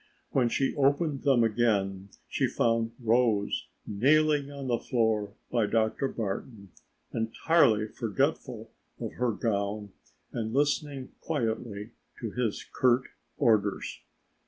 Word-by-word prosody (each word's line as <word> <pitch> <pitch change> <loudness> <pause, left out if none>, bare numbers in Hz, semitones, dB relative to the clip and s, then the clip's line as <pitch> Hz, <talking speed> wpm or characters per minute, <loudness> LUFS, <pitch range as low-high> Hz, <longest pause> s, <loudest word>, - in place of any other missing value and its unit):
When 125 -3 +3
she 135 +3 +1
opened 140 0 +2
them 135 -5 +4
again 100 -4 +1 0.2
she - - +1
found 115 -1 +1
Rose 115 -3 +2 0.2
kneeling 145 +6 +3
on 140 -1 -7
the 120 -2 +1
floor 110 -4 0 0.2
by 115 -4 +2
Dr. 110 +5 +1
Barton, 100 -3 -5 0.4
entirely 110 -1 +3
forgetful 110 -2 -2 0.3
of - - -4
her 125 -1 0
gown 105 -1 -2 0.4
and 110 -2 -3
listening 145 -1 0
quietly 115 -6 -2 0.3
to 115 -3 -4
his 120 -3 -2
curt 130 0 +3 0.3
orders. 110 -7 +1
115 Hz, 110 wpm, -29 LUFS, 105-135 Hz, 0.4 s, them